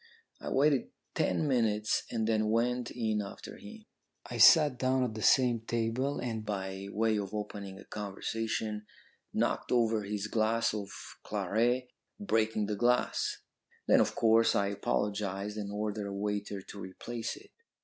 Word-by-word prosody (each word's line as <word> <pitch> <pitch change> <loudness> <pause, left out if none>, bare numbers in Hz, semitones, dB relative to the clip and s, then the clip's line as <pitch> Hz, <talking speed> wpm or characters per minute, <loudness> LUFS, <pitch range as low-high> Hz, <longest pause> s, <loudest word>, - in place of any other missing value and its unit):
I - - -5
waited 140 0 +2 0.2
ten 155 - +1
minutes 110 -5 +1
and 110 -2 -1
then 110 -1 +2
went 120 +2 +1
in 110 -3 -1
after 100 - -8
him. 220 +1 -12 0.4
I - - -6
sat 150 -7 +7
down 130 0 +2
at 120 -3 -2
the 110 - -6
same 120 0 +4
table, 115 +5 -1
and, 115 -3 -3
by 95 -2 -4
way 110 +1 +1
of 100 +1 -5
opening 100 -2 -5
a - - -12
conversation, 105 +1 -3 0.4
knocked - - -1
over 115 -3 +3
his 105 0 -3
glass 110 +1 +1
of 100 -2 -4 0.3
claret, 120 +4 0 0.3
breaking 110 - +1
the 105 0 -2
glass. 120 +4 +1 0.4
Then, - - +6
of - - 0
course, 115 0 +4
I 100 0 +2
apologised 100 0 -2
and 105 -2 -4
ordered 105 0 -3
a 100 - -5
waiter 100 -1 -3
to 100 - -10
replace 110 +5 -5
it. 405 +1 -16
110 Hz, 150 wpm, -31 LUFS, 105-120 Hz, 0.4 s, sat